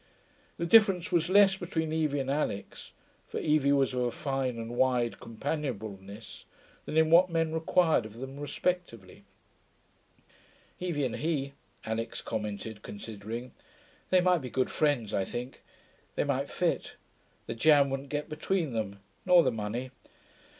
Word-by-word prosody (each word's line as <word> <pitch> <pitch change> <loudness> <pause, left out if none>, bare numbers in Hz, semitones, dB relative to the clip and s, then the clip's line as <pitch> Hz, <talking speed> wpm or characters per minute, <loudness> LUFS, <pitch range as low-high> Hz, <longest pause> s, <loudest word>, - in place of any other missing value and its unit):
The 170 - -2
difference 190 -2 +5
was 170 0 +2
less 195 0 +6
between 160 -4 -2
Evie 155 -3 +1
and 135 0 -2
Alix 140 -9 -3 0.4
(for - - -4
Evie 150 -2 +2
was 135 -2 +3
of 125 - -1
a 120 - +1
fine 135 -1 -2
and 115 0 -5
wide 125 -2 +1
companionableness) 110 -6 -5 0.4
than 155 - -3
in 160 0 +4
what 180 +2 +7
men 165 -1 0
required 160 -6 +2
of 110 +1 -14
them 135 +3 -7
respectively. 145 - -3 1.5
'Evie 170 -6 -1
and 125 - -3
he,' 145 -4 -1 0.3
Alix 115 +1 -3
commented, 105 0 -4
considering 110 +3 -6
them. 125 - -14 0.6
'They 185 -1 +5
might 180 -2 +3
be 130 - -6
good 130 +1 0
friends, 140 -9 +1
I 95 - +1
think. 125 +6 -6 0.5
They - - +1
might - - -1
fit. - - -1 0.5
The - - -4
jam 140 +3 +5
wouldn't 135 +1 -4
get 145 +1 -2
between 155 -1 -1
them 100 -3 -3 0.2
nor 180 -2 +6
the 130 - +2
money.... 115 +3 -4
135 Hz, 150 wpm, -30 LUFS, 115-160 Hz, 1.5 s, what